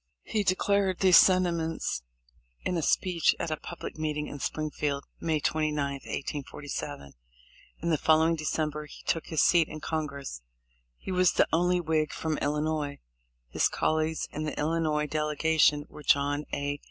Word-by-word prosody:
He 215 - -1
declared 195 0 +2
these 185 -3 +7
sentiments 170 - +2 0.6
in 180 - 0
a 165 - 0
speech 175 +2 +2
at 170 - -2
a - - +1
public 170 -1 -8
meeting 150 -1 -1
in 145 - -7
Springfield, 150 -1 -2 0.2
May 160 -2 0
29, 155 0 0 0.2
1847. 140 - -6 0.7
In 170 - 0
the 155 - +2
following 160 +1 +4
December 155 -1 -2
he - - -13
took 165 - -1
his 160 - +2
seat 170 -3 +5
in 155 - -7
Congress. 145 - -4 0.6
He - - -7
was 185 -1 +3
the - - +3
only 180 +2 +3
Whig 155 -2 0
from 160 -2 -2
Illinois. 150 -1 -1 0.5
His - - +2
col 155 - +1
leagues 160 0 -1
in 150 - -5
the 150 - -4
Illinois 155 -1 0
delegation 150 0 +2
were 150 - -12
John 145 +1 +2
A. 145 0 -2
155 Hz, 155 wpm, -28 LUFS, 150-165 Hz, 0.7 s, these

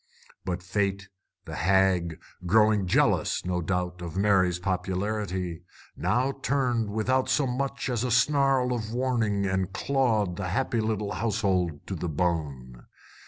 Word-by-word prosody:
But 90 -1 -3
Fate, 100 +1 -1 0.4
the - - -8
hag, 95 -3 +2 0.3
growing 105 0 +4
jealous, - - +2
no 90 -1 -1
doubt, 90 +1 -2
of 85 0 -6
Mary's 95 -3 +3
popularity, 95 -1 -2 0.3
now 125 +4 +1
turned 125 -5 0
without 130 +5 0
so 130 +2 +2
much 140 +2 -2
as 120 -2 -1
a 125 - -1
snarl 130 +1 +3
of 110 -3 -4
warning 115 -5 0
and 95 -1 -1
clawed 110 -5 0
the 95 -2 -3
happy 115 +4 0
little 110 -2 -2
household 95 -8 -1
to - - -5
the 90 -1 -3
bone. 70 -7 -3
100 Hz, 135 wpm, -27 LUFS, 90-120 Hz, 0.4 s, growing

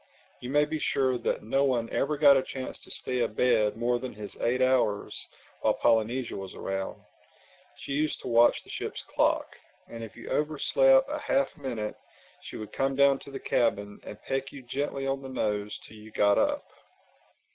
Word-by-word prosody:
You 125 - -6
may 145 +2 +4
be 155 +1 -3
sure 130 -4 +1
that - - -1
no 135 +6 +1
one 125 -4 +1
ever 150 +2 0
got 140 -1 +7
a 135 - +4
chance 130 0 -6
to - - -10
stay 125 -1 -2
abed 110 -2 +2
more 120 +1 +1
than 130 +1 -6
his 105 -1 -8
eight 125 +2 +1
hours 130 -5 +2 0.4
while - - +2
Polynesia 115 +3 +1
was 95 -1 -7
around. 95 0 -4 0.7
She - - -8
used 150 +2 0
to - - -7
watch 120 0 +4
the - - -12
ship's - - -5
clock; - - 0 0.3
and 115 0 -8
if 110 0 -9
you - - -10
overslept 135 -3 +3
a - - -3
half 135 0 0
minute, 120 -7 -4 0.5
she - - -9
would 110 - -7
come 135 0 0
down 140 0 +5
to - - -12
the 135 -1 -6
cabin 105 -4 0
and 105 - -9
peck 135 0 -2
you 135 - -10
gently 135 +2 -3
on 135 0 -1
the 135 - -8
nose 105 -4 -2
till 110 - -13
you 105 +1 -12
got 100 -1 +3
up. - - +1
125 Hz, 190 wpm, -28 LUFS, 110-135 Hz, 0.7 s, got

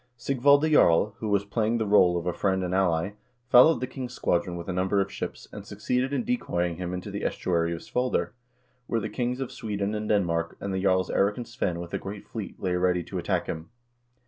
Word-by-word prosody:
Sigvalde 140 +4 +3
Jarl, 100 - +5
who 110 - -3
was 100 0 +2
playing 110 +2 0
the 110 - 0
role 90 -4 +5
of 85 - -4
a 90 - 0
friend 95 +1 0
and 90 0 -2
ally, 90 -1 +1 0.4
followed 125 +2 +7
the - - 0
king's 125 -1 -7
squadron 85 0 0
with 85 - -7
a 90 - -2
number 95 +2 +1
of 95 0 0
ships, - - -6
and - - -8
succeeded 125 +2 -1
in 140 - 0
decoying 90 - -1
him 90 -1 -4
into 90 0 -5
the - - -4
estuary 85 -2 0
of 85 - -4
S - - -15
voider, 125 +1 0 0.6
where 115 - 0
the 110 0 -4
kings 125 +2 -2
of 135 -1 -4
Sweden 105 -5 -3
and 105 0 -3
Denmark, 85 -5 0
and 100 -1 -4
the 95 - -1
jarls 95 -2 +2
Eirik 100 +1 +2
and 120 -2 -5
Svein 100 -8 -2
with 85 -1 -8
a - - -1
great 100 +1 -7
fleet 110 -4 -7
lay 90 -1 -1
ready 90 0 +1
to - - -5
attack - - -1
him. 80 +3 -6
100 Hz, 225 wpm, -27 LUFS, 90-120 Hz, 0.6 s, followed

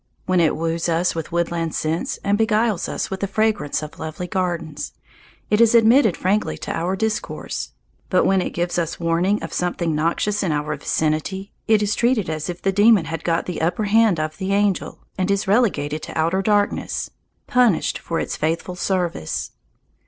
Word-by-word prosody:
When 185 -1 +2
it 165 -2 +3
woos 165 +1 -1
us 170 +2 +1
with 165 +1 -5
woodland 170 -1 -1
scents 165 - -1
and 200 - +2
beguiles 220 -2 +1
us - - -3
with 190 - -3
the 200 - -1
fragrance 205 -8 0
of 150 - -9
lovely 160 +3 -5
gardens, 170 -4 -3 0.6
it 210 +2 +4
is 230 0 +5
admitted 230 -2 +5
frankly 200 +4 0
to - - -5
our 175 +3 -1
discourse. 220 +3 -3 0.4
But - - +3
when 190 -1 +3
it - - -2
gives 175 +1 -1
us 165 -2 -3
warning 170 +4 +1
of 165 - -6
something 175 -2 -1
noxious 170 +7 0
in 185 - 0
our 150 0 -1
vicinity, 155 +6 -1 0.2
it 215 -2 +4
is 205 0 +1
treated 235 -7 +1
as 155 +2 -4
if 175 0 -6
the 195 - +2
demon 205 -2 +5
had 160 -1 -5
got 165 -1 0
the 180 - -4
upper 175 +6 0
hand 210 -3 +3
of 155 0 -3
the 190 0 -1
angel, 200 -2 0 0.2
and 185 +1 0
is 200 -1 0
relegated 160 -9 +1
to - - -7
outer 165 +4 +1
darkness, 205 0 0 0.3
punished 245 -8 +2
for 165 - -3
its - - -3
faithful 165 +3 -2
service. 180 - -2
180 Hz, 180 wpm, -22 LUFS, 165-205 Hz, 0.6 s, is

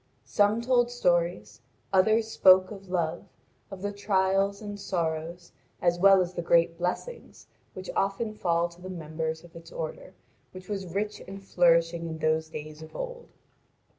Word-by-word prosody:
Some 210 +3 +2
told 245 -1 +3
stories; 170 - 0 0.3
others 220 +4 +4
spoke 185 -3 +5
of 195 -2 -10
love, 170 -1 -1 0.5
of 195 -1 -9
the 205 - -1
trials 195 0 +1
and 205 -1 -7
sorrows, 170 -2 -3 0.3
as 175 0 +1
well 195 0 +7
as 180 -1 -2
of - - -21
the - - 0
great 170 0 +3
blessings, 185 - -4 0.3
which 185 0 -8
often 200 +3 -1
fall 170 -4 +1
to 170 +1 -17
the 185 - -8
members 160 -2 -4
of 170 - -17
its 165 0 -12
order, 165 +3 -6 0.4
which 185 0 -11
was 195 -3 -4
rich 210 +1 -2
and 195 +1 -8
flourishing 170 -2 +2
in 160 -1 -5
those 160 0 0
days 155 0 -8
of 160 - -12
old. - - -6
185 Hz, 165 wpm, -28 LUFS, 165-200 Hz, 0.5 s, well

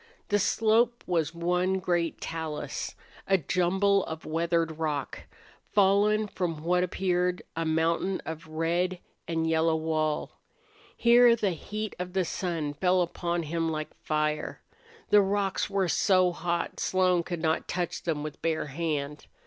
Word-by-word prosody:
The 205 - +3
slope 225 +4 +2
was 165 -2 0
one 180 +2 +1
great 175 -3 -1
talus, 160 -2 -4 0.3
a 195 - +4
jumble 190 +4 +2
of 160 0 -7
weathered 165 0 0
rock, 150 -4 -3 0.5
fallen 205 +2 +4
from 165 -6 -3
what 180 +1 +2
appeared 180 0 0
a 165 0 -1
mountain 165 +4 +1
of 160 0 -6
red 170 +3 0 0.3
and 165 -1 0
yellow 160 0 +2
wall. 155 -1 -1 0.7
Here 240 0 +6
the 210 -4 0
heat 210 +5 -5
of 180 0 -5
the 190 -2 +1
sun 165 -5 -2
fell 180 +3 +2
upon 170 0 -2
him 165 +1 -1
like 155 -1 -4
fire. 150 0 -1 0.5
The 210 - +8
rocks 195 0 0
were 195 -2 +1
so 185 +1 +3
hot 175 0 -2
Slone 185 -2 +2
could 170 -1 -5
not 160 0 0
touch 175 -2 -2
them 155 -3 -2
with 155 -1 -7
bare 165 -1 0
hand. 150 -1 -3
175 Hz, 140 wpm, -28 LUFS, 160-190 Hz, 0.7 s, The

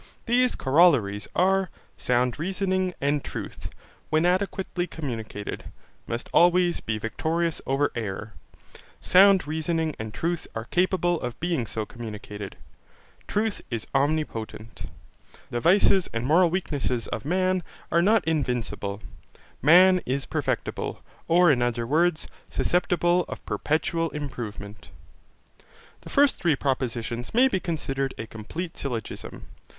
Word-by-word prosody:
These 250 +1 +3
corollaries 130 - +3
are, 190 +1 +3 0.3
"Sound 125 +1 0
reasoning 185 +1 -1
and 145 +1 0
truth, - - -6 0.4
when 155 +2 +2
adequately 185 -1 0
communicated, 115 -10 -5 0.4
must 115 +1 -4
always 175 0 +4
be 110 -1 -3
victorious 160 +9 -1
over 135 +2 +1
error: 110 -1 -5 0.7
Sound 190 -2 +6
reasoning 160 +1 -1
and 110 0 -5
truth 170 +7 -2
are 115 0 -4
capable 175 +1 +1
of 125 -1 -5
being 165 -9 -1
so 110 0 -3
communicated: 105 -3 -8 0.7
Truth 215 0 -1
is 115 -3 -3
omnipotent: 135 -6 -2 0.6
The 120 - -1
vices 190 - +4
and 115 +1 -2
moral 170 +5 +5
weakness 145 -9 -1
of 110 - -5
man 185 +3 +1 0.3
are 170 - +4
not 205 0 +3
invincible: 120 -8 -2 0.6
Man 180 +4 +7
is 135 +2 -1
perfectible, - - -3 0.2
or 175 0 +5
in 125 -3 +2
other 120 -1 0
words, 160 +5 +2 0.2
susceptible 175 0 +2
of - - -8
perpetual 165 +2 0
improvement." 115 -9 -7 1.1
The - - -11
first 285 -1 +4
three 170 -5 +2
propositions 120 - -2
may 255 +3 +6
be 220 -8 0
considered 135 -6 -2
a 115 - -5
complete 160 +12 -6
syllogism. 120 -6 -6
155 Hz, 120 wpm, -26 LUFS, 120-180 Hz, 1.1 s, Man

